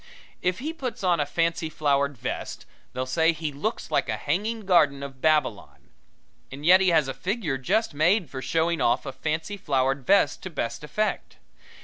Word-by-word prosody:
If 180 0 0
he 305 +5 -4
puts 260 -10 -5
on 175 -3 +2
a 145 - 0
fancy 165 +1 0
flowered 140 -2 0
vest, - - -5 0.3
they'll 130 +1 -3
say 160 +5 +2
he 155 -1 -4
looks 155 +11 -4
like - - +1
a - - -1
Hanging 210 +10 -2
Garden 150 -8 +3
of 135 -2 -9
Babylon. 155 -9 0 0.6
And 140 +3 -8
yet 185 +3 +7
he 190 - +4
has 155 -5 +3
a 135 - -3
figure 165 - -2
just 210 - 0
made 175 +5 +2
for 130 0 -7
showing 165 +2 0
off 120 +4 +2
a 135 - -4
fancy 160 +9 -3
flowered 135 -6 0
vest 200 +10 +3
to 190 - -6
best 150 -3 -4
effect. 210 +8 -2
160 Hz, 185 wpm, -25 LUFS, 140-185 Hz, 0.6 s, yet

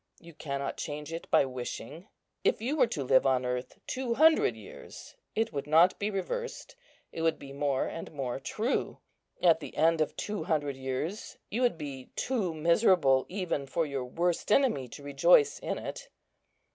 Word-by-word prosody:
You 170 0 -14
cannot 140 -2 -4
change 150 +2 -5
it 165 - -6
by - - +5
wishing; 130 - -7 0.4
if - - +2
you 250 +7 -1
were 255 -5 +4
to 145 - -3
live 130 +1 +4
on 130 -1 +2
earth 125 0 -3
two 255 -2 -2
hundred 320 - +5
years, - - -12 0.2
it 225 +1 0
would 140 0 -4
not 165 +4 +5
be 205 - 0
reversed, 475 - -4 0.4
it 165 - -5
would 165 -1 +2
be 135 -1 -10
more 140 -1 0
and 165 - -6
more 135 -4 -3
true. 220 - -2 0.5
At 165 -3 +6
the - - -9
end 160 +1 +3
of 155 - -1
two 210 -6 -3
hundred 145 -4 0
years 135 +9 -4
you 230 +5 -1
would 245 -8 +2
be 140 -4 -7
too 225 -9 -1
miserable 165 - +3
even 180 -7 -2
for 165 +4 0
your 140 -3 -3
worst 170 +9 -1
enemy 220 - +3
to 140 +4 -11
rejoice 145 +1 +4
in - - -3
it." - - -7
160 Hz, 175 wpm, -30 LUFS, 140-200 Hz, 0.5 s, At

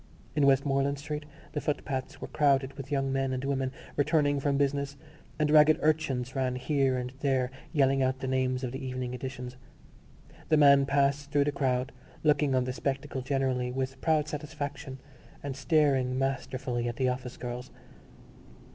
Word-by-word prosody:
In 145 -2 +4
Westmoreland 140 +1 +2
Street 150 +1 -5 0.3
the 150 - -3
footpaths 145 -1 -3
were - - -6
crowded 140 -2 +2
with 135 0 -8
young 135 -1 0
men 135 -1 0
and 130 0 -3
women 135 -1 -1 0.2
returning 145 -1 +2
from 140 0 +1
business 140 0 0 0.4
and 150 -1 +1
ragged 155 0 +7
urchins 145 -5 0
ran 130 -1 0
here 135 0 +1
and 125 0 -4
there 130 -2 +1 0.2
yelling 135 -3 +3
out 130 0 +1
the 130 - -5
names 130 0 0
of 125 - -2
the 135 +2 -6
evening 125 -1 -4
editions. 125 0 -6 0.9
The 155 - +5
man 140 -2 +6
passed 140 +1 +1
through 145 0 +3
the 145 - 0
crowd, 130 -2 0 0.3
looking 145 -3 +3
on 130 - +3
the 125 0 -3
spectacle 135 0 -3
generally 130 -2 0
with 130 +1 -3
proud 155 -2 +2
satisfaction 145 -2 -5 0.5
and 140 -2 -4
staring 135 -3 +2
masterfully 130 -2 -2
at 120 - -3
the 130 +1 +1
office 125 0 -4
girls. 125 +1 -6
135 Hz, 165 wpm, -29 LUFS, 130-145 Hz, 0.9 s, ragged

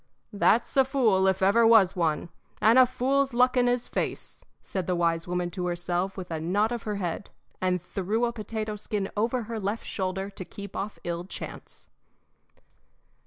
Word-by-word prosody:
"That's 210 +3 +2
a 270 - +7
fool, 235 -8 +2
if 190 0 +1
ever 225 +4 +5
was 215 -5 +6
one, 165 -2 0 0.3
and 225 +4 +6
a 255 - +7
fool's 265 +1 0
luck 250 +2 +4
in 245 -1 +3
his 245 0 0
face," - - -4 0.2
said 190 -3 -4
the 180 - +1
wise 170 0 0
woman 180 0 -2
to 180 -1 -3
herself 175 +2 -2
with 180 -2 -7
a 160 - -2
nod 200 +8 +1
of 240 -1 -3
her 210 - -1
head, 185 0 -4 0.3
and 185 -1 +1
threw 200 +6 -1
a 235 - -2
potato 215 -1 -4
skin 205 -1 -3
over 230 +3 0
her 225 0 -5
left 205 +3 -3
shoulder 190 +1 -3
to 195 -1 -7
keep 200 +2 -10
off 205 +2 -4
ill 170 0 -3
chance. 190 - -9
200 Hz, 180 wpm, -27 LUFS, 180-230 Hz, 0.3 s, a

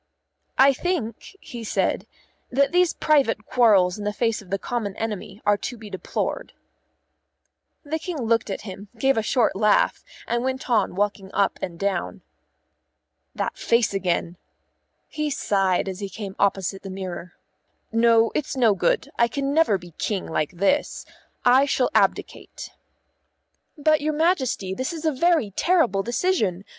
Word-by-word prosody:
"I 275 +1 +6
think," 310 - -3
he 240 -5 -8
said, 215 - -1 0.4
"that 275 +2 +2
these 360 -1 +3
private 270 -8 +1
quarrels 205 -6 +3
in - - -5
the 210 - -1
face 225 +1 -1
of 195 - -16
the 195 - 0
common 210 -2 -3
enemy 210 -2 -5
are 205 0 +4
to 245 +4 -5
be 215 -2 -11
deplored." - - -4 1.3
The 315 +1 -3
King 340 0 -5
looked 230 -2 +1
at 195 - -4
him, 200 0 -9
gave 270 +3 +2
a 225 - +1
short 225 -1 +1
laugh, 210 +1 +2 0.2
and 235 +1 -1
went 260 0 -3
on 215 -5 +2
walking 200 -1 -2
up 200 - +1
and 170 -2 -5
down. 200 +1 -2 1.1
"That - - -3
face 235 -3 +2
again," 175 -2 -1 0.7
he 305 -1 -3
sighed 195 -9 +1
as 190 -1 -5
he 200 -1 -4
came 195 0 -7
opposite 195 -1 0
the 195 - -8
mirror. 185 -2 -6 0.6
"No, 230 0 +4
it's 275 -2 -2
no 230 -5 +4
good; 180 -3 +1
I 235 - +5
can 275 +3 -2
never 315 -10 +3
be 175 -1 -13
King 200 -4 -2
like 155 0 -2
this. 200 +12 0 0.4
I 260 +3 +5
shall 255 -3 +1
abdicate." - - -1 1.1
"But, 305 0 +3
your 305 +1 0
Majesty, 285 - 0
this 260 - -3
is 325 -1 -6
a 315 - +3
very 305 - +2
terrible 250 - +2
decision. 225 - 0
225 Hz, 155 wpm, -24 LUFS, 195-275 Hz, 1.3 s, I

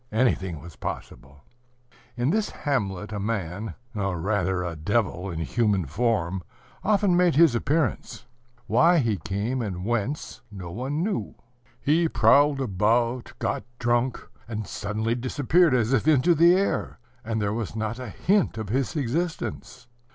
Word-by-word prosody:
Anything 95 - +1
was 85 0 -11
possible. 70 +1 -7 0.7
In 120 +4 +1
this 215 +2 +1
hamlet 105 -8 -2
a 105 - -3
man, 100 -2 -3 0.2
or 95 -5 -2
rather 95 -1 0
a 85 -2 -4
devil 95 +2 -1
in 85 - -5
human 105 -1 +1
form, 95 - 0 0.4
often 205 -3 +3
made 175 -3 +3
his 160 -3 +6
appearance. 135 -1 -1 0.4
Why 165 +10 +4
he 115 -8 +1
came, 100 - -2
and 95 -4 -4
whence, 120 0 -2
no 90 -4 -7
one 135 - -2
knew. 195 - -2 0.4
He 160 +3 +2
prowled 140 +6 +4
about, 115 +3 +1
got - - -2
drunk, 120 +1 +1 0.3
and 110 -2 -4
suddenly 110 +3 -2
disappeared 140 +5 +2
as 120 +1 +1
if 135 +3 +1
into 155 +3 +5
the 170 +3 +6
air, 195 +1 -1 0.3
and 110 0 -2
there 105 -1 0
was 110 -1 -4
not 110 +2 -3
a 125 -3 -6
hint 195 - +1
of 110 -3 -5
his 135 +7 -1
existence. 145 -2 -3
115 Hz, 145 wpm, -25 LUFS, 100-140 Hz, 0.7 s, his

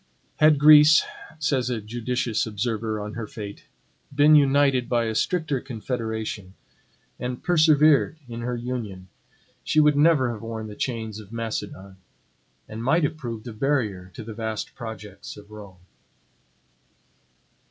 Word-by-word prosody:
Had 155 -1 +5
Greece, 150 +2 +7 0.3
says 135 -5 0
a 120 -3 -2
judicious 115 +1 -2
observer 110 0 -2
on 105 +1 -6
her 115 -2 -5
fate, 105 -2 -9 0.5
been 145 +2 +5
united 140 -3 +4
by 120 -1 +2
a 110 - -2
stricter 155 +2 0
confederation, 110 -5 -5 0.6
and 125 0 -5
persevered 155 -2 +4
in 120 -1 -7
her 125 +1 -2
union, 115 -7 -6 0.5
she 155 - +2
would 150 -1 +5
never 145 -4 +4
have 110 -3 -7
worn 115 -1 -6
the 105 -1 -9
chains 110 -4 -4
of 105 -1 -13
Macedon; 105 -4 -5 0.7
and 110 +1 -7
might 160 +7 +2
have 150 +2 0
proved 120 -6 -7
a 120 - -6
barrier 110 -7 -1
to 115 - -7
the 110 +1 -8
vast 110 -1 -4
projects 110 -4 -9
of 105 0 -14
Rome. 100 -4 -12
115 Hz, 140 wpm, -24 LUFS, 110-140 Hz, 0.7 s, Greece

